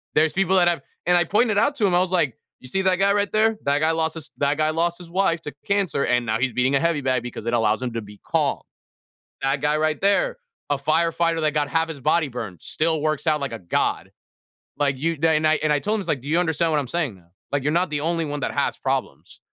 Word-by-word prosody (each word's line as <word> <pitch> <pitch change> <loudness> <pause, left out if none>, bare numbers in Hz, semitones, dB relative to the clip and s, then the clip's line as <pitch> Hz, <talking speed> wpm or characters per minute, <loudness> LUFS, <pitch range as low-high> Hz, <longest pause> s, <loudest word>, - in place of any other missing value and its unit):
There's 155 0 +3
people 190 0 +2
that 180 -2 +5
have 175 -1 +1 0.2
and 180 - +4
I 175 - +3
pointed 210 +4 +2
out 285 +6 +2
to 225 -7 +1
him, 190 - +2
I 175 - +4
was 185 0 0
like, 155 -10 +1 0.2
"You 130 - -12
see 190 - 0
that 185 -1 +3
guy 195 +2 +3
right 205 0 0
there? 220 +1 +2
That 140 +1 +2
guy 155 +1 +2
lost 160 0 -1
his 160 -2 -8
that 140 0 +1
guy 155 0 +2
lost 170 +2 0
his 175 -2 -11
wife 180 -3 +1
to 150 - -6
cancer, 200 -8 +1
and 125 -1 +1
now 110 0 0
he's 125 -1 0
beating 130 +3 +1
a - - +4
heavy 165 -2 +1
bag 130 -2 +1
because 120 -2 -7
it 115 - -1
allows 110 -1 +2
him 125 -2 -3
to 115 - -3
be 105 -1 -13
calm. - - 0 0.8
That 135 +1 0
guy 150 +1 +2
right 155 0 0
there, 345 - +2 0.3
a 145 - +1
firefighter 165 +3 +1
that 155 -1 +1
got 145 -1 +1
half 165 +2 +1
his 155 -4 -7
body 155 +2 +2
burned, 100 - -7
still 160 0 0
works 155 +1 -1
out 155 -1 +2
like 140 -3 -3
a 115 - -6
god." 85 -2 -1 0.7
Like, 140 -2 0
you 165 +4 -1
then 155 0 +2
I 155 - +5
and 155 -1 +2
I 145 - +2
told 210 +8 -1
him, - - 0
I - - -6
was - - -14
like, 135 - 0
"Do 135 - -9
you 165 +3 +2
understand 165 -1 0
what 150 - +2
I'm 135 - -6
saying 155 -8 -1
now? 85 -2 -22 0.2
Like, 145 -1 0
you're 150 +2 0
not 175 +3 +2
the 145 -1 -1
only 165 +1 -1
one 145 0 -4
that - - -2
has - - 0
problems." - - -3
155 Hz, 275 wpm, -23 LUFS, 140-175 Hz, 0.8 s, that